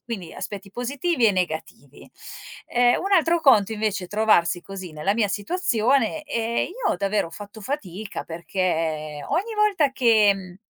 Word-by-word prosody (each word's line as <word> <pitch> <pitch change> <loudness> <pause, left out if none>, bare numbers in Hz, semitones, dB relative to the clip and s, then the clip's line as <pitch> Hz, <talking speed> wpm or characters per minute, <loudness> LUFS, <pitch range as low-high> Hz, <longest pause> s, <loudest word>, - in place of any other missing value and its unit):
quindi 195 -8 -6
aspetti 200 -1 -7
positivi 260 - -1
e 210 - +5
negativi. 175 -4 -4 0.6
Ehm, 245 0 +3
un 395 +1 -2
altro 340 -1 +4
conto 220 -7 +5
invece, 210 -3 -1
è - - -8
trovarsi 205 -5 +2
così 190 -4 -8
nella 175 +7 -1
mia 215 -3 +1
situazione 245 - 0
e 235 -5 -1
io 430 +1 -2
davvero 200 -3 0
ho - - -18
fatto 205 +3 -10
fatica, 205 - -5
perché 160 -4 -2
ogni 400 +9 -1
volta 400 -10 +2
che, 225 -6 +5
mhmm, 185 -2 -10
215 Hz, 150 wpm, -24 LUFS, 185-270 Hz, 0.6 s, e